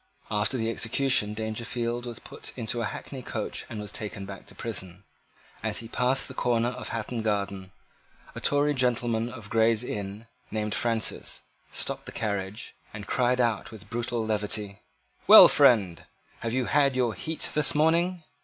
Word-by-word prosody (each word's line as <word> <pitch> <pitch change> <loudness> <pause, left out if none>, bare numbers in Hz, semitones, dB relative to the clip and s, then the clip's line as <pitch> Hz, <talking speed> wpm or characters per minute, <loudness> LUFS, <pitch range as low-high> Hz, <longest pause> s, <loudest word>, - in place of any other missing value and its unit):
After 105 +5 +1
the 115 -1 0
execution 115 -2 +2
Dangerfield 115 +2 -3
was 120 -2 -6
put - - -9
into 120 0 -1
a - - 0
hackney 135 +3 -6
coach - - -5
and 110 - -6
was 105 -1 -5
taken 100 -2 -5
back 100 0 -9
to - - -14
prison. 95 -5 -6 0.6
As - - -1
he 115 - -5
passed 125 +3 +1
the 130 - -7
corner 120 -2 +1
of 125 +1 -6
Hatton 115 +1 -3
Garden, 100 -3 -2 0.6
a - - -7
Tory 145 +1 +3
gentleman 120 -3 +1
of 115 -5 -10
Gray's 115 0 +3
Inn, 105 -1 -5 0.2
named 105 -1 -2
Francis, 115 -2 -1 0.3
stopped - - -2
the - - -5
carriage, 100 0 -3 0.2
and 105 -1 -8
cried 125 +3 +1
out 115 -5 +1
with 110 -1 -12
brutal 120 -1 -2
levity, 105 -1 -2 0.5
"Well, - - +12
friend, 95 -9 +4 0.4
have 115 - -3
you 130 +1 0
had 140 -1 +3
your 125 -3 +1
heat 155 - -2
this 150 0 +2
morning?" 170 +3 +2
115 Hz, 165 wpm, -27 LUFS, 105-125 Hz, 0.6 s, Well